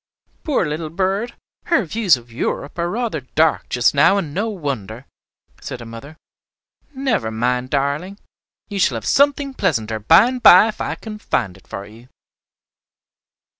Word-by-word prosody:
"Poor 290 - 0
little 155 +1 -4
bird, 195 +7 -2 0.3
her 275 - +2
views 190 - +2
of 120 0 -16
'Europe' 140 +6 -4
are 170 0 0
rather 220 - -2
dark 155 +5 0
just 120 -1 +2
now, 150 +8 +4
and 160 -7 -3
no 210 +6 -1
wonder," 135 - -5 0.6
said 125 - -6
her 120 - -9
mother. 115 +7 -11 0.8
"Never 260 - -1
mind, 125 +3 -1
darling, 145 +8 -2 0.5
you 205 -2 -5
shall 140 -9 +2
have 110 - -5
something 280 0 +2
pleasanter 115 - -1
by 165 - +6
and 255 0 -4
by 210 -1 +8
if 215 - -7
I - - -2
can 215 -1 -9
find 95 - -2
it 95 - -20
for 100 - -7
you." 115 +4 -16
155 Hz, 160 wpm, -20 LUFS, -, 0.8 s, by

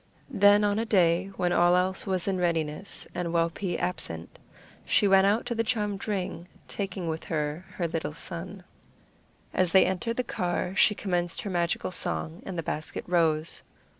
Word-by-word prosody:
Then 205 -2 +5
on 205 +1 +2
a - - +1
day 180 -4 +3
when 175 -1 +1
all 180 +2 +3
was 185 -2 0
in 190 -2 0
readiness 165 +1 -2
and 175 -1 -2
Wau 165 0 +2
pee 175 +1 -3
absent, 85 - -4 0.4
she 205 - +3
went 195 0 +6
out 210 +3 +2
to 245 - -2
the 230 0 0
charmed 210 -3 -2
ring, 185 -4 -3 0.2
taking 190 -3 -4
with 160 0 -3
her 150 +1 -2
her 175 - -1
little 160 -2 -3
son. 180 +4 -3 0.9
As 185 -2 +1
they 190 - +7
entered 190 +6 -2
the 250 - +1
car 180 -3 -2
she 210 - +5
commenced 175 -4 -1
her 200 - -4
magical 175 0 0
song, 165 -1 -2
and 190 -2 -5
the 165 - -2
basket 150 +1 -4
rose. 165 -3 +1
180 Hz, 170 wpm, -27 LUFS, 170-195 Hz, 0.9 s, they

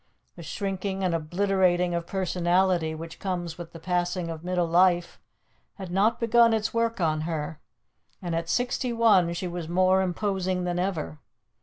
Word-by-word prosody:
The - - -10
shrinking 195 -1 -3
and 180 -2 +1
obliterating 180 +1 +1
of 170 0 -3
personality 180 -2 +1
which 165 +1 -9
comes 175 -3 -4
with 170 -1 -8
the 165 - -10
passing 175 0 -1
of 160 0 -8
middle 180 -1 0
life 175 +1 +2 0.6
had 190 -3 -8
not 215 +5 +2
begun 230 0 +4
its 220 0 -2
work 230 -1 0
on 155 -3 +1
her, 155 -1 -4 0.6
and 175 -2 -4
at 165 0 -2
sixty 245 0 0
one 215 -7 +4
she 180 - -3
was 175 -2 -5
more 185 +2 +3
imposing 185 -1 -1
than 175 0 -1
ever. 175 -5 -3
180 Hz, 160 wpm, -26 LUFS, 170-195 Hz, 0.6 s, begun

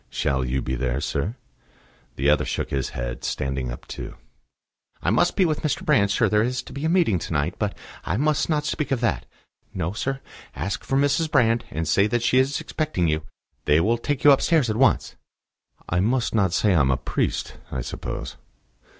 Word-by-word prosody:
"Shall 65 -2 0
you 65 +1 -1
be 65 - -3
there, 65 0 -1
sir?" 75 - -2 0.8
The 70 - 0
other 75 0 +4
shook - - -3
his 65 -2 -1
head, - - -4
standing 65 -2 -2
up - - -8
too. - - -7 0.9
"I - - +2
must - - +2
be 190 - +4
with 155 -3 0
Mr. 155 - -1
Brand, 100 -1 +4
sir; 100 - +2
there 105 0 +3
is 125 +2 -1
to - - -11
be 140 - -5
a - - +2
meeting 165 - +3
to - - -6
night; 75 +4 0
but 105 -2 -2 0.3
I 95 - -1
must 150 +4 +1
not 150 -2 +1
speak 150 0 -2
of 135 -3 0
that.... 120 - 0 0.5
No, 90 -1 -2
sir; 135 +4 -2 0.4
ask 100 - -3
for 135 - 0
Mrs. 145 +3 +2
Brand, 115 -5 +3
and 80 0 -3
say 100 +7 +3
that 120 +2 0
she 130 +2 +4
is 135 +2 +1
expecting 145 - -1
you. 75 0 0 0.4
They 75 +1 +4
will 115 +7 +2
take 145 +2 -2
you 145 - +8
upstairs 140 -2 +3
at - - -2
once." 135 +4 +2 0.7
"I 90 - 0
must 115 +6 +1
not 100 -5 +2
say 100 +3 +2
I 85 - +4
am 70 -2 +3
a 65 - +2
priest, 65 - -2
I 65 - -2
suppose?" - - -6
105 Hz, 205 wpm, -24 LUFS, -, 0.9 s, you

